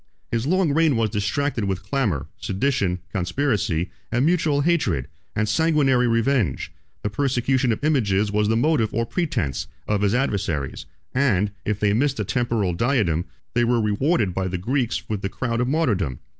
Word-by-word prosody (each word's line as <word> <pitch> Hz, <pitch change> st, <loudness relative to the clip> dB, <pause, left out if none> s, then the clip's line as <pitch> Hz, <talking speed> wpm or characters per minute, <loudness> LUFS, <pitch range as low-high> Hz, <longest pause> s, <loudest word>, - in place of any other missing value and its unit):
His 115 Hz, +3 st, -1 dB
long 180 Hz, -3 st, +2 dB
reign 160 Hz, -2 st, +3 dB
was 115 Hz, -2 st, +1 dB
distracted 110 Hz, +3 st, -1 dB
with 95 Hz, -1 st, -2 dB
clamor, 95 Hz, -, -1 dB
sedition, 95 Hz, -4 st, 0 dB
conspiracy, 100 Hz, -, 0 dB, 0.2 s
and 120 Hz, +4 st, +2 dB
mutual 160 Hz, -4 st, +2 dB
hatred, 115 Hz, -, +1 dB, 0.3 s
and 110 Hz, 0 st, +1 dB
sanguinary 135 Hz, -1 st, +3 dB
revenge; 115 Hz, -, +1 dB, 0.3 s
the 105 Hz, -, 0 dB
persecution 130 Hz, 0 st, +1 dB
of 110 Hz, -, -3 dB
images 105 Hz, -9 st, +2 dB
was 105 Hz, 0 st, +1 dB
the 115 Hz, +1 st, +2 dB
motive 120 Hz, -4 st, +2 dB
or 115 Hz, +1 st, +1 dB
pretence, 75 Hz, -, -2 dB, 0.2 s
of 105 Hz, -1 st, +1 dB
his 105 Hz, +2 st, +2 dB
adversaries; 100 Hz, -, -1 dB, 0.3 s
and, 105 Hz, -7 st, +2 dB
if 105 Hz, -1 st, -1 dB
they 105 Hz, -1 st, +2 dB
missed 140 Hz, +5 st, +1 dB
a -, -, -1 dB
temporal 115 Hz, -7 st, 0 dB
diadem, 95 Hz, -, +1 dB, 0.3 s
they 120 Hz, -, +2 dB
were 120 Hz, 0 st, +2 dB
rewarded 105 Hz, -, +1 dB
by 95 Hz, +1 st, -1 dB
the 90 Hz, 0 st, -2 dB
Greeks 120 Hz, +6 st, -1 dB
with 105 Hz, -3 st, -3 dB
the 100 Hz, -, -2 dB
crown 120 Hz, +1 st, -2 dB
of 125 Hz, -, 0 dB
martyrdom. 105 Hz, -, 0 dB
115 Hz, 165 wpm, -23 LUFS, 100-140 Hz, 0.3 s, reign